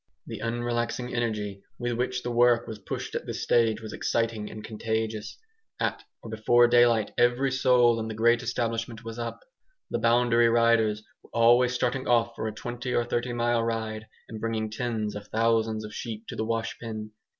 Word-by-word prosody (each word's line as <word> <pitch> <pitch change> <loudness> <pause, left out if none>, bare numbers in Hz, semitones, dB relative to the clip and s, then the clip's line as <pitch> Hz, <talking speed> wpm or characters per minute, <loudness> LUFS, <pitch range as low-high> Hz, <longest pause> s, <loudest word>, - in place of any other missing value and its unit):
The - - -7
unrelaxing 120 +1 -2
energy 105 -4 -2 0.2
with 120 0 -2
which 125 +1 -2
the 120 - -2
work 120 0 +4
was 110 -1 -7
pushed 95 - -5
at - - -4
this - - -4
stage 115 -2 +2
was 110 - -7
exciting 115 -2 -1
and 110 - -9
contagious; 110 0 -3 0.4
at - - -1 0.2
or 115 - -8
before 120 +2 +4
daylight 120 -3 +4
every 120 +3 +3
soul 125 -3 +4
in 110 - -3
the 110 - -5
great 120 +2 +3
establishment 115 -1 -3
was 115 +1 -6
up. 115 - -5 0.5
The - - 0
boundary 120 0 +4
riders 115 -2 +3 0.2
were - - -21
always 120 +2 +5
starting 130 +1 -1
off 115 -1 +2
for 110 - -3
a - - -2
twenty 120 +3 -4
or 120 - +2
thirty 120 +1 -1
mile 120 -1 +1
ride, 110 -1 -3 0.2
and 110 -1 -8
bringing 110 -1 -2
tens 110 -2 -2
of 105 0 -7
thousands 110 -1 +1
of 105 - -9
sheep 115 -2 -6
to - - -5
the 110 - -2
wash 115 +1 -2
pen. 110 -2 -6
115 Hz, 185 wpm, -27 LUFS, 110-120 Hz, 0.5 s, always